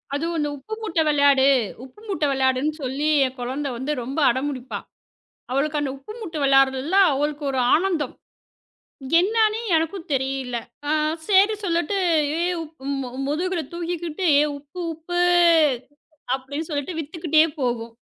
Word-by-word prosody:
அது 310 Hz, +3 st, -2 dB
இந்த 295 Hz, 0 st, 0 dB
உப்பு 430 Hz, +12 st, -9 dB
மூட்டை 335 Hz, -7 st, 0 dB
விளையாடு. 285 Hz, -2 st, +4 dB, 0.4 s
உப்பு 265 Hz, +10 st, -14 dB
மூட்டை 315 Hz, -7 st, 0 dB
விளையாடு 260 Hz, -1 st, +2 dB
என்று 305 Hz, +1 st, -1 dB
சொல்லி 275 Hz, +4 st, -2 dB, 0.2 s
என் 260 Hz, 0 st, -4 dB
குழந்தை 265 Hz, +3 st, -3 dB
வந்து 265 Hz, +5 st, -3 dB
மிகவும் 270 Hz, +5 st, 0 dB
அடம் 260 Hz, +4 st, 0 dB
பிடிப்பாள். 255 Hz, -2 st, -6 dB, 0.7 s
அவளுக்கு 295 Hz, +3 st, 0 dB
அந்த 280 Hz, -2 st, -2 dB
உப்பு 275 Hz, +10 st, -11 dB
மூட்டை 330 Hz, -8 st, -6 dB
விளைவயாடுகிறதில் 270 Hz, +5 st, +3 dB, 0.2 s
அவளுக்கு 295 Hz, +1 st, -2 dB
ஒரு 260 Hz, -, -1 dB, 0.2 s
ஆனந்தம். 335 Hz, -5 st, 0 dB, 1.1 s
என்ன 410 Hz, +6 st, 0 dB
என்று 430 Hz, +1 st, -3 dB, 0.2 s
எனக்கும் 330 Hz, +3 st, -1 dB
தெரியவில்லை. 265 Hz, -3 st, -2 dB, 0.3 s
ஆ -, -, -1 dB, 0.4 s
சரி 405 Hz, +2 st, +5 dB
சொல்லிவிட்டு 345 Hz, +2 st, 0 dB, 1.0 s
மு 255 Hz, -, -4 dB, 0.2 s
முதுகில் 335 Hz, 0 st, -2 dB
தூக்கிட்டு 345 Hz, 0 st, -4 dB
ஏ -, -, +5 dB
உப்பு 290 Hz, +6 st, -12 dB
உப்பு 350 Hz, +3 st, -4 dB, 1.2 s
அப்படி 265 Hz, +2 st, -9 dB
என்று 320 Hz, -, -3 dB
சொல்லிவிட்டடு 295 Hz, +3 st, -3 dB
விற்றுக்கொண்டே 315 Hz, 0 st, +2 dB, 0.2 s
போவாள். 235 Hz, -2 st, -2 dB
295 Hz, 140 wpm, -23 LUFS, 265-335 Hz, 1.2 s, சரி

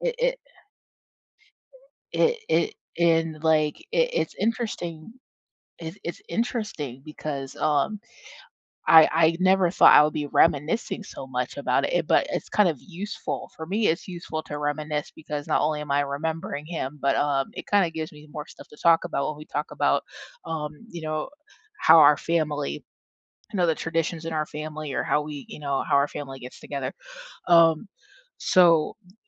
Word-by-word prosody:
it, -, -, -1 dB
it -, -, +1 dB, 1.8 s
It 475 Hz, 0 st, +3 dB
it -, -, +1 dB, 0.2 s
it -, -, -1 dB
and, 165 Hz, -2 st, +2 dB
like, 155 Hz, -2 st, +2 dB, 0.2 s
i -, -, +3 dB
it's -, -, -1 dB
interesting 210 Hz, -6 st, -3 dB, 0.7 s
it's 165 Hz, +3 st, -7 dB
it's 170 Hz, -, -5 dB
interesting 210 Hz, -, -3 dB
because, 145 Hz, -3 st, -6 dB
um, 155 Hz, +8 st, +1 dB, 0.9 s
I 160 Hz, -1 st, +8 dB
I 165 Hz, +1 st, +4 dB
never 185 Hz, -1 st, +4 dB
thought 180 Hz, -, +7 dB
I -, -, +9 dB
would 150 Hz, -, 0 dB
be 150 Hz, -1 st, -2 dB
reminiscing 160 Hz, -, +1 dB
so 135 Hz, -, -9 dB
much 125 Hz, -1 st, -3 dB
about 135 Hz, -1 st, +1 dB
it, -, -, -1 dB
eh, 175 Hz, -, +2 dB
but 160 Hz, 0 st, +2 dB
it's -, -, -3 dB
kind 210 Hz, -3 st, +3 dB
of 155 Hz, -5 st, -2 dB
useful. 195 Hz, +3 st, -6 dB
For 160 Hz, -, -7 dB
me, 205 Hz, +5 st, +1 dB
it's 165 Hz, +4 st, -1 dB
useful 170 Hz, -3 st, -5 dB
to 150 Hz, -, -6 dB
reminisce 150 Hz, 0 st, -2 dB
because 150 Hz, -2 st, -6 dB
not -, -, +2 dB
only 150 Hz, 0 st, 0 dB
am 150 Hz, -1 st, -7 dB
I 140 Hz, -, +3 dB
remembering 150 Hz, +2 st, -4 dB
him, 150 Hz, -4 st, -5 dB
but, 140 Hz, 0 st, +2 dB
um, 140 Hz, -2 st, +1 dB
it -, -, -7 dB
kinda 200 Hz, -5 st, +3 dB
gives 160 Hz, -1 st, -5 dB
me 150 Hz, 0 st, -14 dB
more 150 Hz, -1 st, -6 dB
stuff -, -, -14 dB
to -, -, -16 dB
talk 165 Hz, -1 st, +5 dB
about 140 Hz, -, -2 dB
when 155 Hz, -1 st, -5 dB
we 155 Hz, -, -10 dB
talk 150 Hz, +1 st, -3 dB
about, -, -, +2 dB, 0.4 s
um, 150 Hz, -2 st, -3 dB, 0.2 s
you 170 Hz, -1 st, -7 dB
know, 155 Hz, -1 st, -3 dB, 0.5 s
how 165 Hz, +1 st, +8 dB
our 150 Hz, -1 st, +8 dB
family 150 Hz, -, -2 dB, 0.7 s
you -, -, -2 dB
know, 175 Hz, -2 st, +3 dB
the 160 Hz, -, +2 dB
traditions 165 Hz, 0 st, -2 dB
in 165 Hz, -, -3 dB
our 155 Hz, -1 st, -1 dB
family 155 Hz, -1 st, -6 dB
or -, -, 0 dB
how 150 Hz, -, +1 dB
we, 150 Hz, -2 st, -7 dB
you -, -, -9 dB
know, 140 Hz, -2 st, -1 dB
how -, -, -1 dB
our 140 Hz, +1 st, +4 dB
family 135 Hz, -3 st, -7 dB
gets 125 Hz, 0 st, -10 dB
together. 140 Hz, -1 st, -4 dB, 0.6 s
Um, 165 Hz, +2 st, +5 dB, 0.5 s
so 170 Hz, -4 st, +4 dB
y 180 Hz, 0 st, -22 dB
155 Hz, 180 wpm, -25 LUFS, 150-170 Hz, 1.8 s, I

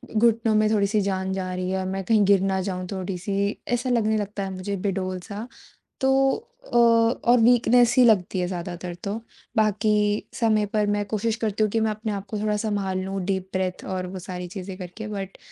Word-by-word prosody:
घुटनों 225 Hz, 0 st, +3 dB
में 215 Hz, 0 st, +3 dB
थोड़ी-सी 210 Hz, 0 st, +2 dB
जान 190 Hz, -1 st, -1 dB
जा 185 Hz, -1 st, -3 dB
रही 180 Hz, 0 st, -3 dB
है 190 Hz, -, 0 dB
और 185 Hz, -, -3 dB
मैं 195 Hz, 0 st, -3 dB
कहीं 215 Hz, +1 st, +3 dB
गिर 195 Hz, -1 st, +5 dB
ना 190 Hz, 0 st, 0 dB
जाऊँ 185 Hz, -1 st, -4 dB
थोड़ी-सी, 195 Hz, +1 st, -2 dB
ऐसा 245 Hz, +1 st, 0 dB
लगने 220 Hz, -3 st, +2 dB
लगता 205 Hz, -1 st, -3 dB
है 195 Hz, -, -3 dB
मुझे 190 Hz, +2 st, -4 dB
बेडोल 185 Hz, -1 st, -2 dB
सा। 210 Hz, +5 st, -7 dB, 0.5 s
तो 270 Hz, -, +2 dB, 0.2 s
अ, -, -, -15 dB
और 235 Hz, +1 st, +4 dB
वीकनेस 240 Hz, 0 st, +5 dB
ही 255 Hz, -, +7 dB
लगती 195 Hz, -4 st, +3 dB
है 180 Hz, -, 0 dB
ज़्यादातर 175 Hz, 0 st, -5 dB
तो 200 Hz, 0 st, -2 dB, 0.4 s
बाकी 215 Hz, 0 st, +2 dB, 0.5 s
समय 215 Hz, -2 st, +3 dB
पर 210 Hz, -1 st, +2 dB
मैं 205 Hz, -, -1 dB
कोशिश 220 Hz, +2 st, -1 dB
करती 215 Hz, 0 st, 0 dB
हूँ 215 Hz, -, +2 dB
कि 225 Hz, -, +1 dB
मैं 220 Hz, 0 st, +1 dB
अपने 215 Hz, 0 st, -3 dB
आप 200 Hz, 0 st, -5 dB
को 215 Hz, -, -2 dB
थोड़ा 210 Hz, 0 st, 0 dB
संभाल 205 Hz, -3 st, -1 dB
लूँ 195 Hz, 0 st, -3 dB
डीप 190 Hz, -1 st, -1 dB
ब्रेथ 185 Hz, -1 st, -2 dB
और 185 Hz, -1 st, -3 dB
वो 185 Hz, +1 st, -6 dB
सारी 180 Hz, -1 st, -6 dB
चीज़ें 190 Hz, 0 st, -7 dB
करके 185 Hz, +4 st, -7 dB
बट 195 Hz, -2 st, -6 dB
200 Hz, 205 wpm, -24 LUFS, 190-220 Hz, 0.5 s, ही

